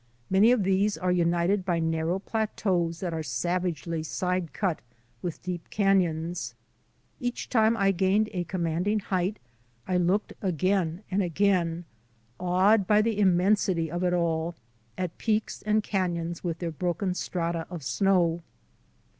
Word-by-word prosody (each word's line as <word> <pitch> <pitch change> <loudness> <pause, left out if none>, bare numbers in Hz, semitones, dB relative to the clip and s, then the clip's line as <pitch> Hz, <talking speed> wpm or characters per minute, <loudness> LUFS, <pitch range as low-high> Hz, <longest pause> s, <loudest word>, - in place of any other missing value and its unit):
Many 200 +5 +6
of 245 -5 +3
these 195 +2 +2
are 180 0 0
united 175 +2 +2
by 175 -2 0
narrow 165 +2 0
plateaus 190 -5 -1
that 175 -3 -2
are 160 - -2
savagely 170 +4 -2
side 180 +1 -2
cut 185 -6 -1 0.4
with 175 -3 -5
deep 175 -2 -5
canons. 175 -4 0 0.6
Each 245 -3 -3
time 225 -1 +3
I 195 -2 +3
gained 195 +3 +2
a 180 -2 -1
commanding 175 +4 0
height 190 0 -1 0.5
I 180 - +1
looked 180 +4 +1
again 185 0 0
and 195 +2 +2
again, 175 -2 +1 0.5
awed 185 +3 +3
by 210 +1 +5
the 220 -2 0
immensity 185 -3 +2
of 175 +1 -2
it 180 -1 +2
all, 170 -1 0 0.4
at 180 -2 -4
peaks 220 -1 -1
and 215 0 +1
canons 175 -4 -2
with 170 -2 -2
their 170 -1 -3
broken 180 +4 -1
strata 170 -2 -2
of 175 -5 -7
snow. 175 0 +2
180 Hz, 140 wpm, -27 LUFS, 170-195 Hz, 0.6 s, Many